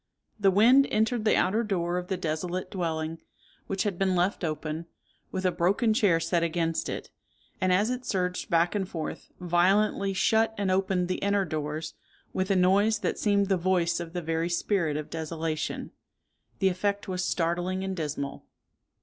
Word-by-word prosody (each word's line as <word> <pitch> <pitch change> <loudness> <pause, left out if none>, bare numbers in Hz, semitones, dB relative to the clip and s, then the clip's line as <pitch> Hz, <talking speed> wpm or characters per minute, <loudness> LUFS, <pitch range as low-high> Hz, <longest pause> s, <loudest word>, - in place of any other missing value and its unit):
The 200 -1 +5
wind 240 +8 +6
entered 220 +1 +1
the 215 - +4
outer 215 +5 +2
door 180 -4 -1
of 180 - -7
the 190 - -2
desolate 175 +2 -3
dwelling, 165 -3 -2 0.5
which 195 -1 -1
had 200 -5 -2
been 190 -1 +2
left 180 +2 0
open, 155 +1 -3 0.4
with 190 -1 -3
a 185 - +4
broken 200 +7 +2
chair 205 -8 +3
set 165 +1 0
against 165 -1 -1
it; - - -5 0.5
and 185 0 +2
as 205 +6 +3
it 250 0 -3
surged 180 -5 -2
back 170 0 +3
and 195 -3 -2
forth, 160 -4 -5
violently 190 +3 +2
shut 220 +3 +2
and 200 -2 0
opened 190 -1 +1
the 185 - -2
inner 200 0 +1
doors, 155 0 -4 0.4
with 190 +1 -1
a 195 - +3
noise 200 +4 +4
that 210 - -2
seemed 200 -1 +2
the 190 -1 +2
voice 175 -1 +1
of 170 -1 -6
the 175 -1 -3
very 165 +1 -1
spirit 170 -3 0
of 150 - -6
desolation. 160 -1 -3 0.7
The 195 - +3
effect 200 +2 -1
was 185 -1 -2
startling 175 +2 -1
and 190 0 -3
dismal." 145 -4 -4
180 Hz, 175 wpm, -28 LUFS, 165-200 Hz, 0.7 s, wind